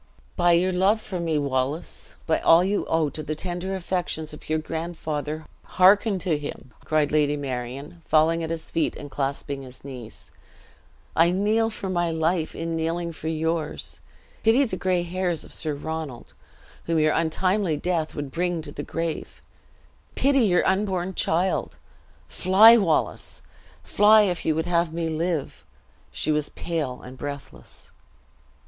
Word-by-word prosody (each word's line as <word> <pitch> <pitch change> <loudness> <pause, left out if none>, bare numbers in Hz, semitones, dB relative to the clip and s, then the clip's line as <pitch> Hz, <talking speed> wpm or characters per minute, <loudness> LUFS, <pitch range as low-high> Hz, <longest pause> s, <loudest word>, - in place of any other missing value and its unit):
"By 175 -1 +4
your 180 +2 +3
love 190 +4 +3
for 190 -4 -5
me, 165 -2 0
Wallace 140 +2 -2
by 160 - +2
all 165 +2 +6
you 200 +2 0
owe 160 -3 +1
to 155 - -6
the 155 +1 -4
tender 180 +3 -3
affections 175 -4 -3
of 150 - -12
your 155 - +2
grandfather, 155 -1 -4 0.2
hearken 195 +2 +4
to 160 -5 +1
him!" 135 -4 -8
cried 155 -2 +1
Lady 150 -1 +2
Marion, 135 +4 -5
falling 160 +2 +3
at 160 - -3
his 165 -1 -5
feet, 165 -2 0
and 145 -1 -9
clasping 140 0 -3
his 130 -1 -12
knees. 125 -5 -10 0.8
"I 165 +1 +5
kneel 210 +5 +2
for 210 -3 -6
my 175 -2 0
life 160 0 0
in 165 0 -3
kneeling 165 +1 -2
for 160 -1 -7
yours! 160 0 -2 0.4
Pity 230 +5 +4
the 220 - -3
gray 185 -1 0
hairs 175 -1 -2
of - - -11
Sir 155 -2 -2
Ronald, 155 -4 -6 0.5
whom 165 -1 0
your 155 -1 +3
untimely 180 +1 +1
death 165 -1 -1
would 145 -2 -5
bring 175 0 -1
to 145 - -8
the 145 - -6
grave! 165 +2 -4 0.8
Pity 275 0 +3
your 190 -7 +3
unborn 190 -2 0
child! 180 +2 0 0.5
Fly, 205 +5 +7
Wallace, 185 -9 0 0.4
fly 210 +1 +6
if 180 -4 -1
you 160 - +3
would 160 +1 -1
have 170 -1 +1
me 165 0 -2
live!" 160 -2 -2 0.5
She 155 - -1
was 150 -1 0
pale 155 -7 -4
and 130 +1 -11
breathless. 140 - -9
165 Hz, 155 wpm, -25 LUFS, 150-180 Hz, 0.8 s, Fly